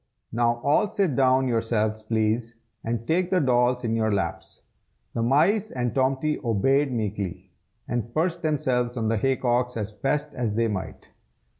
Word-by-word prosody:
now 120 +1 +1
all 150 +8 +3
sit 185 -10 0
down 130 0 +3
yourselves, 110 -2 0
please, 110 +1 -1 0.3
and 115 0 -3
take 175 +2 +1
the 185 -1 +3
dolls 125 -3 +2
in 115 -1 0
your 110 -1 +1
laps." 95 -5 -3 0.5
The 115 - -1
mice 170 - +3
and 120 -2 -2
Tomty 135 +3 +1
obeyed 135 +5 +2
meekly, 105 -5 -4 0.4
and 120 -1 -3
perched 170 +4 0
themselves 130 -6 0
on 110 -2 0
the 115 - +1
hay 135 +5 +1
cocks 125 -1 0
as 105 -1 -3
best 145 +7 -1
they 115 -1 0
might. 100 -4 -5
120 Hz, 155 wpm, -25 LUFS, 115-135 Hz, 0.5 s, all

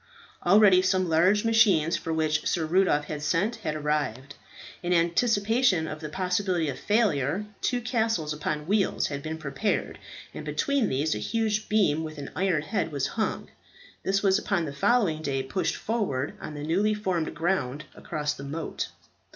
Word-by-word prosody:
Already 195 0 +6
some 185 0 +1
large 185 +7 +3
machines 205 -8 +4
for 165 - -4
which 155 -1 0
Sir 165 -2 0
Rudolph 165 -3 +2
had 150 0 -5
sent 180 +10 0
had 155 -9 -3
arrived. 145 -3 -2 0.5
In 175 0 0
anticipation 200 +2 +2
of 155 0 -6
the 155 -1 -6
possibility 180 -1 0
of 135 - -5
failure, 200 - +1 0.2
two 245 -1 0
castles 225 -10 0
upon 150 0 -3
wheels 200 +2 +1
had 140 -1 -4
been 155 +2 -5
prepared, 160 +8 -2 0.3
and - - -7
between 280 -6 0
these 145 +4 0
a - - -3
huge 215 - -1
beam 180 -8 +2
with 155 0 -7
an 140 -1 -7
iron 180 -5 +1
head 175 +1 -2
was 140 -2 -1
hung. 220 -1 -2 0.5
This 195 +1 0
was 195 -1 +4
upon 175 -5 -1
the 140 - -5
following 165 0 +2
day 135 -3 -1
pushed 160 +8 -1
forward 185 - -2
on 150 - -7
the 145 - -6
newly 200 +7 +1
formed 185 -6 -2
ground 150 -4 -1
across 150 -1 -3
the 140 - -9
moat. 150 +3 -4
170 Hz, 165 wpm, -27 LUFS, 150-205 Hz, 0.5 s, Already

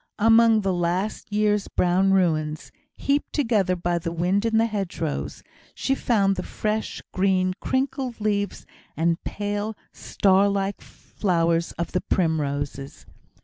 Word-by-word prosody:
Among 225 0 +5
the 195 -2 0
last 180 +5 -2
year's 210 -1 +1
brown 185 +2 +2
ruins, 155 -7 0 0.2
heaped 285 +1 -1
together 215 - +1
by 175 0 -1
the 165 0 -4
wind 180 +6 +1
in 225 -1 +1
the 225 - +4
hedgerows, 195 -8 -3 0.3
she 270 - 0
found 200 -7 +2
the - - -1
fresh 215 +3 -3
green 185 -1 +2
crinkled 260 -2 -2
leaves 205 -1 -1 0.3
and 165 +2 0
pale 205 +1 -3
star 195 0 +2
like 200 0 -2
flowers 170 -3 -1
of 170 - -4
the 180 - 0
primroses. 145 -5 -2
195 Hz, 130 wpm, -24 LUFS, 170-215 Hz, 0.3 s, Among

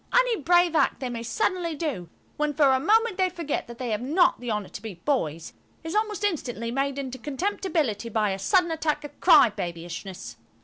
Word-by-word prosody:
Any - - +3
brave 350 +1 +3
act - - +2
they 255 - -3
may 235 -1 -5
suddenly 350 - -1
do, 280 - -4 0.3
when 300 -1 -1
for 280 -3 +5
a 260 - +2
moment 440 - +2
they 370 -1 +3
forget 335 -5 -4
that 235 0 -10
they 245 -2 -3
have 210 +1 -1
not 320 +8 +3
the 245 0 -6
honour 210 -3 -2
to - - -9
be 215 -4 -7
boys, 165 - -2 0.3
is 325 +1 -5
almost 425 -1 -1
instantly 245 - -2
made 275 +2 -1
into 260 -2 -5
contemptibility 295 - -2
by 215 -2 +1
a 190 - -3
sudden 350 - +2
attack 320 -2 -1
of 290 -1 -10
crybabyishness. 175 -2 +2
280 Hz, 190 wpm, -26 LUFS, 225-350 Hz, 0.3 s, for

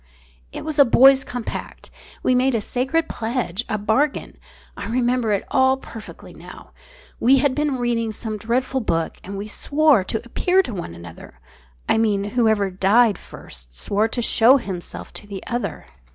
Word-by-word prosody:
"It - - -7
was 310 -2 -3
a - - +10
boys' 270 +2 +6
compact. 245 -2 -7 0.3
We 255 - +3
made 255 0 +2
a - - +1
sacred 270 +9 -1
pledge, 230 -3 -3
a 215 - 0
bargain. 225 +8 0 0.4
I - - -6
remember 245 -1 0
it 200 - 0
all 260 0 +3
perfectly 225 -4 -11
now. - - -13 0.5
We 260 +4 +5
had 270 0 +2
been 295 -1 -1
reading 235 -2 -1
some 215 0 -4
dreadful 250 +4 -1
book 165 -7 -2
and 195 +1 -7
we 205 +2 -5
swore 285 0 +2
to 220 +4 -4
appear 365 +10 +2
to 245 - -6
one 170 - -6
another 85 -6 -12 0.5
I - - +2
mean, 210 -3 +1
whoever 220 -5 +2
died 200 +3 +3
first - - -12
swore 205 - 0
to 240 +1 -3
show 235 +4 +5
himself 185 -8 -7
to 205 - -11
the 200 -2 -8
other. 240 0 -4
235 Hz, 165 wpm, -21 LUFS, 205-260 Hz, 0.5 s, a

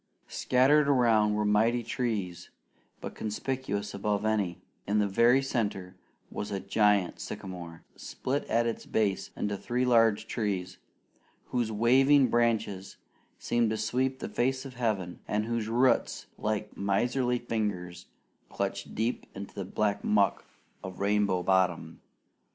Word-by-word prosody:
Scattered 140 +4 +3
around 110 -6 +3
were 105 0 0
mighty 115 +3 +2
trees, 110 -7 -3 0.5
but - - -6
conspicuous 105 -2 -3
above 105 +1 -1
any, 100 -5 0 0.3
in 105 +2 +1
the 105 -1 +2
very 120 +6 +4
center, 100 -8 -2 0.4
was 105 - -4
a 100 -2 -2
giant 100 -1 +2
sycamore, 85 -3 -8
split 135 +3 -3
at 115 +1 +1
its 115 - -3
base 100 -3 0
into 105 0 -1
three 120 +5 -1
large 115 -4 +3
trees, 95 -5 -3 0.7
whose 120 -3 -1
waving 130 +5 +4
branches 110 -5 0 0.4
seemed 120 -2 +1
to 110 - -1
sweep 130 +5 -1
the - - -5
face 130 +2 -1
of 135 - -8
heaven, 105 -8 -2
and 105 +1 0
whose 115 -1 -2
roots, 125 +3 +1
like 105 0 -3
miserly 120 +6 0
fingers, 105 -7 -4 0.4
clutched - - -4
deep 115 +3 -2
into 100 +1 -8
the 100 - -5
black 100 +2 -1
muck 100 -2 +2 0.4
of 95 -1 -8
Rainbow 100 -2 +1
Bottom. 90 -4 +1
105 Hz, 135 wpm, -29 LUFS, 100-120 Hz, 0.7 s, very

